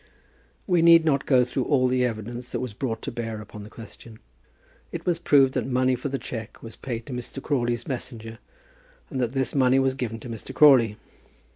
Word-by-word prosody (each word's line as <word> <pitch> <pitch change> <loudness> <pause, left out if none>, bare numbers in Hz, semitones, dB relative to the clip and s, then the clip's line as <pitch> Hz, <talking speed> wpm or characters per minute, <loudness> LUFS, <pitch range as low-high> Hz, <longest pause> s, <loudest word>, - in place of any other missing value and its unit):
We 175 -2 +2
need 165 -1 +7
not 140 -3 +1
go 125 -3 +4
through 125 +1 -2
all 130 -3 +3
the 125 0 +1
evidence 120 +1 -4
that 120 - -2
was 125 -3 -5
brought 115 0 -4
to 140 - -4
bear 115 -2 -5
upon 105 0 -10
the 105 - -10
question. 115 0 -12 0.7
It - - -6
was 175 -2 +1
proved 135 -5 +4
that - - -2
money 130 0 +2
for 125 +3 -3
the 135 - -2
cheque 115 -4 -8
was 115 -1 -9
paid 120 -3 -5
to 135 - -7
Mr. 125 +2 -5
Crawley's 120 -4 -1
messenger, 120 -4 -6 0.7
and 130 - -2
that 120 0 -1
this 135 -1 -1
money 130 -1 +3
was 135 0 +2
given 120 -4 -4
to - - -8
Mr. 115 -2 -8
Crawley. 125 -8 +6
125 Hz, 205 wpm, -25 LUFS, 115-135 Hz, 0.7 s, need